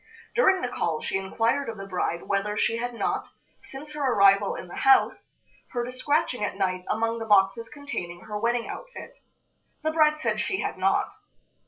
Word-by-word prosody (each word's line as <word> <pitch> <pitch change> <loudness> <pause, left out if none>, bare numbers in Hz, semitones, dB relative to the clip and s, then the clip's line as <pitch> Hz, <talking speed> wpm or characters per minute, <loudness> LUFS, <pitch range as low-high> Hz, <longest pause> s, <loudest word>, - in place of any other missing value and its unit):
During 385 -6 +4
the - - +1
call 165 -9 -1
she 190 - -1
inquired 230 +7 0
of 225 - -6
the 195 - -7
bride 180 -3 -2
whether 205 +1 -1
she 230 - +1
had 245 +1 -3
not, - - -1 0.4
since 295 +3 -9
her 300 - -5
arrival 205 - +4
in - - -7
the - - -9
house, 400 -1 +3 0.4
heard 240 -1 -1
a - - -5
scratching 255 -2 0
at - - -2
night 185 -2 -1
among 230 +1 0
the 225 - -4
boxes 205 +2 +3
containing 180 -13 -6
her 210 0 -5
wedding 235 +1 0
outfit. - - -9 0.7
The 315 - +1
bride 305 -1 +4
said 310 - -1
she 380 - -1
had - - -2
not. - - +1
230 Hz, 185 wpm, -26 LUFS, 195-290 Hz, 0.7 s, During